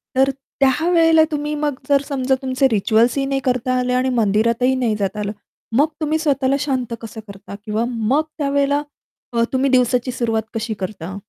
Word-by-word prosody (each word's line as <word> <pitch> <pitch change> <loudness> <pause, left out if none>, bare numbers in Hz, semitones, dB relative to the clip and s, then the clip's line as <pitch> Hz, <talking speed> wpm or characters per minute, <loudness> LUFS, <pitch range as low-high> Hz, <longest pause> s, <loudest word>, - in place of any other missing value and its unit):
तर 270 +1 +4 0.3
त्या 275 +5 +2
वेळेला 325 -2 +5
तुम्ही 295 0 -2
मग 295 -1 -1 0.2
जर 280 -1 +4
समजा 265 -2 0
तुमचे 265 0 +2
रिच्युअल्स 225 +4 +2
ही 275 - +1
नाही 270 0 -1
करता 255 0 0
आले 250 0 0
आणि 255 +1 +1
मंदिरातही 230 +4 +2
नाही 240 -4 0
जाता 200 0 -2
आलं, 205 0 -2 0.5
मग 290 +3 +5
तुम्ही 310 +1 +1
स्वतःला 275 -3 +1
शांत 260 -5 -2
कसं 225 0 -8
करता 200 0 -10
किंवा 215 +2 -1
मग 245 +5 0
त्यावेळेला 285 0 +1 0.5
अ, 230 0 +2
तुम्ही 270 +1 +2
दिवसाची 250 0 +2
सुरुवात 230 -3 -1
कशी 225 0 -3
करता? 190 -1 -5
255 Hz, 175 wpm, -20 LUFS, 225-280 Hz, 0.5 s, वेळेला